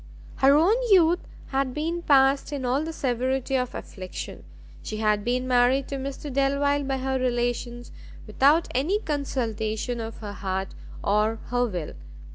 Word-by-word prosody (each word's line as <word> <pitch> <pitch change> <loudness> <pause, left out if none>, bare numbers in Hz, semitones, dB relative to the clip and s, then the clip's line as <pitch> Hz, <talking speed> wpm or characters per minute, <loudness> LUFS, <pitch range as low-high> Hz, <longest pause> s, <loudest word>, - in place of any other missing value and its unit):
Her 275 +1 +5
own 355 +10 +4
youth 355 -3 +5 0.3
had 270 -2 -1
been 330 +3 -2
passed 275 -2 +3
in 280 -3 -3
all 260 +4 +1
the 325 - -4
severity 260 -1 -1
of 250 -1 -1
affliction; 185 -2 -7 0.4
she 215 - -5
had 210 -1 +1
been 250 +2 -1
married 255 +2 +3
to 275 - -3
Mr 275 +1 -6
Delvile 280 +1 +2
by 270 0 -1
her 265 0 -1
relations, 240 -1 -2 0.3
without 280 +9 +3
any 305 +11 +1
consultation 240 - -2
of 225 0 -6
her 205 -2 -7
heart 190 0 -3 0.3
or 210 +2 +2 0.2
her 245 0 +2
will. 175 -8 -5
260 Hz, 150 wpm, -25 LUFS, 235-280 Hz, 0.4 s, Her